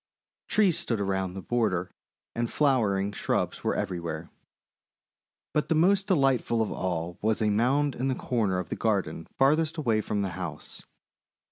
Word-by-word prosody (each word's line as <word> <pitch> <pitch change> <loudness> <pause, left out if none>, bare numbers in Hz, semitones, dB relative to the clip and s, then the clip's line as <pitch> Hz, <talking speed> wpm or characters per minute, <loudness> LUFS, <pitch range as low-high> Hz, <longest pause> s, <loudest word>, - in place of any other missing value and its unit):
Trees 185 -6 +3
stood 120 -10 -1
around 95 -2 -1
the 95 - -6
border 100 -7 0 0.4
and 120 0 -1
flower 130 -9 +2
ing 100 +1 -1
shrubs - - -2
were - - +1
everywhere. 85 -2 -4 1.2
But 150 - 0
the 160 - +3
most 190 +5 +3
delightful 135 - +2
of 110 - 0
all 85 -1 -3
was 110 0 +1
a 105 -1 +2
mound 135 +7 +2
in 130 +2 -2
the 130 - 0
corner 110 -9 0
of 90 -3 -4
the - - -2
garden 95 -7 -1
farthest 155 +4 +3
away 115 -8 +1
from 105 -1 -1
the 95 - -1
house. 90 -3 -7
110 Hz, 160 wpm, -28 LUFS, 95-135 Hz, 1.2 s, Trees